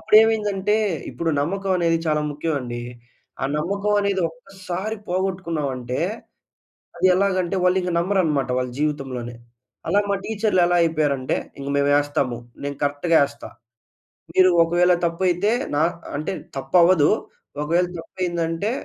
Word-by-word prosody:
అప్పుడేమైందంటే 215 -2 +3 0.3
ఇప్పుడు 165 -1 -2
నమ్మకం 195 +6 -1
అనేది 165 -1 +2
చాలా 150 -1 +2
ముఖ్యం 150 +2 -2
అండి. 120 -1 -5 0.6
ఆ - - +1
నమ్మకం 200 +6 0
అనేది 200 -1 0
ఒక్కసారి 190 +4 -6
పోగొట్టుకున్నాం 180 -5 -1
అంటే, 125 0 -4 1.0
అది - - +2
ఎలాగంటే 185 -1 +1
వాళ్లింకా 180 0 +2
నమ్మరన్నమాట 170 -7 +1
వాళ్ళ 125 0 -2
జీవితంలోనే. 135 -5 -3 0.5
అలా 205 - +4
మా - - +3
టీచర్‌లు 210 -3 +1
ఎలా 175 0 +2
అయిపోయారు 155 -3 +1
అంటే, 130 - -1 0.2
"ఇంక 140 0 -5
మేము 140 0 +2
వేస్తాము. 145 -4 0 0.3
నేను 140 0 -3
కరెక్ట్‌గా 145 +4 +2
ఎస్తా. 140 - -11 0.8
మీరు 185 0 +5
ఒకవేళ 175 +2 +3
తప్పైతే 180 +3 +1 0.3
నా - - +2 0.4
అంటే 150 +5 -3 0.2
తప్పవ్వదు. 170 +3 +4 0.5
ఒకవేళ 170 +4 +2
తప్పు 165 - -12
అయిందంటే 170 +2 -1
170 Hz, 125 wpm, -22 LUFS, 145-190 Hz, 1.0 s, మీరు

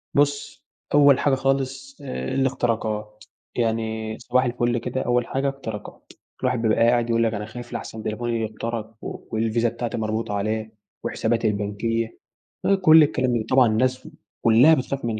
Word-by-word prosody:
بُصّ 145 0 0 0.3
أول 140 -2 +6
حاجة 140 -2 +2
خالص 135 - -2
آآ، 65 0 -4
الاختراقات 110 -5 -1 0.3
يعني 110 -1 -1
صباح 125 +1 +1
الفل 120 0 0
كده، 125 +2 -3
أول 120 -1 +1
حاجة 135 +1 0
اختراقات، 110 -6 -8 0.3
الواحد 125 -2 0
بيبقى 110 -2 +2
قاعد 120 -1 +2
يقول 115 0 +2
لك 115 -1 +1
أنا 105 0 -4
خايف 120 +2 -9
لأحسن 110 -1 -6
تليفوني 115 +2 -2
يُخترق 110 0 -4
والفيزا 115 +1 -1
بتاعتي 115 0 -4
مربوطة 110 -1 -2
عليه 110 +2 -2 0.3
وحساباتي - - 0
البنكية، 110 +2 -2 0.6
كُلّ 160 -2 +8
الكلام 125 -6 0
طبعًا 130 -2 +5
الناس 130 +6 0 0.3
كلّها 120 +8 +6
بتخاف 135 -2 -1
من 110 -2 -2
115 Hz, 140 wpm, -23 LUFS, 110-130 Hz, 0.6 s, كُلّ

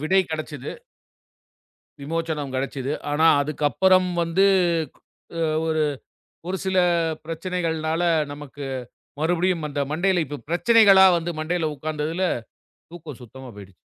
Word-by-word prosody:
விடை 185 +6 +3
கிடைச்சுது. 150 -3 -5 1.3
விமோச்சனம் 155 -2 -3
கிடைச்சுது. 135 +1 -3 0.2
ஆனா 155 +2 +3 0.2
அதுக்கப்புறம் 180 +6 +2
வந்து 170 +4 +2 0.9
அ - - -1 0.3
ஒரு 155 -1 +1 0.7
ஒரு 190 - -1
சில 190 0 +1 0.5
பிரச்சனைகள்னால 165 -1 -2 0.3
நமக்கு 145 0 -9 0.6
மறுபடியும் 170 0 0
அந்த 145 0 -3
மண்டையில 175 +2 +1
இப்ப 145 +1 -7
பிரச்சனைகளா 195 0 +6
வந்து 170 +1 -4
மண்டையில 160 0 -1
உக்காந்ததுல 155 +5 -3 0.7
தூக்கம் 160 -7 -10
சுத்தமா 130 +2 -11
போயிடுச்சு. 100 -2 -13
160 Hz, 105 wpm, -23 LUFS, 145-180 Hz, 1.3 s, பிரச்சனைகளா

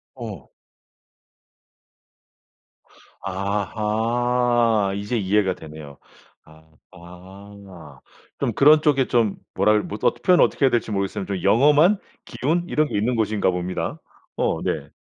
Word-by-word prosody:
어. 110 - -9 2.7
아하. 110 +3 0
이제 105 +4 -3
이해가 100 -2 +1
되네요. 75 -4 -11 0.9
아하. 90 -3 -14 0.4
그럼 - - -2
그런 150 +2 +6
쪽에 135 -4 +2
좀 115 -4 +1 0.2
뭐라 105 - +3
해 105 - +3
뭐 105 - -7
어떻 - - +1
표현 180 -1 +4
어떻게 140 - +2
해야할지 120 -4 0
모르겠습 100 -1 -3
좀 95 -3 -4
영험한 150 - +4 0.3
기운 165 +7 -2
이런 155 -2 +1
게 - - -3
있는 120 +5 0
곳인가 105 -3 0
봅니다. 90 0 -4 0.4
어 - - -1
네. - - -3
105 Hz, 230 characters per minute, -22 LUFS, 95-120 Hz, 2.7 s, 그런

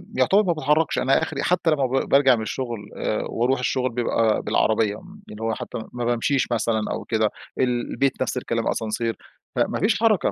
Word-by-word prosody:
يعتبر 205 -1 +4
ما 180 -4 +1
باتحركش، 155 0 +1
أنا 135 +4 +3
آخري 160 - -3
حتى 175 -2 +2
لما 140 -3 +2
ب 130 +1 -1
بارجع 135 -2 +5
من 110 - -4
الشغل، 115 -2 -5
آآ 110 - -1
وأروح 125 +3 +1
الشغل 130 0 0
بيبقى 115 -2 +1
بالعربية، 110 -1 +1
م 190 - -13
اللي 105 +1 -9
هو 115 0 0
حتى - - -6 0.2
ما 120 -1 -3
بامشيش 120 +3 +1
مثلًا 115 -1 +1
أو - - -3
كده، 110 -2 +1 0.3
ال 125 -2 0
البيت 135 -1 0
نفس 130 - -1
الكلام، 115 -2 -2
أسانسير، 115 +1 -1 0.4
فما - - 0
فيش 205 0 +2
حركة. 220 -4 +3
125 Hz, 190 wpm, -23 LUFS, 115-140 Hz, 0.4 s, بارجع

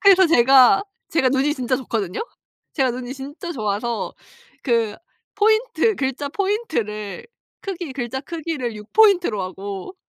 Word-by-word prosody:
그래서 380 -2 +7
제가 265 +3 +6 0.3
제가 265 -5 +2
눈이 275 +2 +1
진짜 255 0 0
좋거든요. 220 -8 -3 0.5
제가 265 -4 +1
눈이 250 +2 -5
진짜 290 +6 -7
좋아서 220 -1 -2 0.5
그 230 -4 +1 0.4
포인트 435 +1 +2
글자 275 -1 -2
포인트를 320 - -2 0.3
크기 350 -7 -5
글자 255 0 -3
크기를 300 -7 -4
6 210 0 -12
포인트로 365 - +4
하고 195 - -6
265 Hz, 280 characters per minute, -22 LUFS, 235-350 Hz, 0.5 s, 그래서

